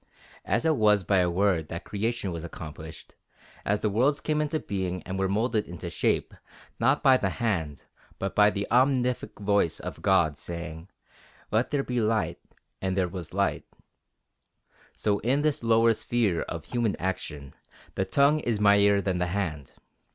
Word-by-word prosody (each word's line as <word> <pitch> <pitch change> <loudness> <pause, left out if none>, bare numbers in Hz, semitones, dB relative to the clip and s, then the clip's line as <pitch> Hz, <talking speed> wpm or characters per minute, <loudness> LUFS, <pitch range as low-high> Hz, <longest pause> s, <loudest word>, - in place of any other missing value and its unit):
As 115 - 0
it 160 -3 +3
was 105 -2 +4
by 95 +1 +2
a 90 -1 +2
word 90 -3 +1
that 85 +2 -5
creation 105 -1 -2
was 85 -1 -5
accomplished, 80 -1 -9 0.5
as 105 +1 0
the 105 - +1
worlds 135 +8 +2
came 155 -1 0
into 150 +1 -1
being 95 -5 -3
and 95 +1 -5
were 95 -1 +1
moulded 110 +2 0
into 90 -1 -7
shape, - - 0 0.5
not 140 +3 +2
by 135 -2 +6
the 95 - -1
hand, 85 -9 -2 0.3
but 95 0 -3
by 105 0 +6
the 100 -1 -3
omnific 125 0 +2
voice 100 -4 +1
of - - -7
God, 80 -6 +2
saying, 85 +1 -7 0.6
"Let 110 +3 +1
there 145 -2 0
be 125 -2 -1
light 110 0 0 0.4
and 95 0 -1
there 95 -2 +2
was 90 -3 -7
light," 100 +1 0 1.3
so 100 -1 +1
in 135 +5 +1
this 150 -2 +1
lower 115 0 +4
sphere 110 -6 0
of 85 - -6
human 120 -4 -1
action, 75 -7 -5 0.4
the 95 - 0
tongue 140 +10 +3
is 115 -7 -1
mightier 100 -1 +5
than 95 -2 -1
the 90 - 0
hand. 85 -7 -3
100 Hz, 165 wpm, -27 LUFS, 90-115 Hz, 1.3 s, by